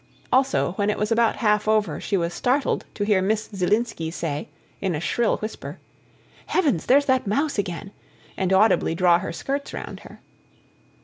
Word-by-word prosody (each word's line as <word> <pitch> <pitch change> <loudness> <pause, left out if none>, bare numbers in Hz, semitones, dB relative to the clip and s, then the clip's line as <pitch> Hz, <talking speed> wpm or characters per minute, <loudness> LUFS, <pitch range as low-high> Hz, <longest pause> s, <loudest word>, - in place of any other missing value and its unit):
Also, 175 - +2
when 205 0 +1
it 210 - 0
was 210 +1 -1
about 230 0 +3
half 210 -1 +1
over 215 -7 +1
she 200 - 0
was 170 -1 -1
startled 260 +7 0
to 205 - -2
hear 205 -2 +3
Miss 215 +3 0
Zielinski 195 -2 0
say, 155 -3 -4 0.3
in 190 -4 0
a - - -2
shrill 230 +7 +1
whisper: 215 +1 -7 0.7
"Heavens! 285 - +1
There's 280 +3 +5
that 260 -5 +1
mouse 280 +4 0
again," 195 0 -4 0.4
and 190 -1 -1
audibly 190 -4 +3
draw 175 -1 +4
her 165 - -4
skirts 275 +10 -4
round - - -6
her. - - -14
210 Hz, 170 wpm, -24 LUFS, 180-235 Hz, 0.7 s, There's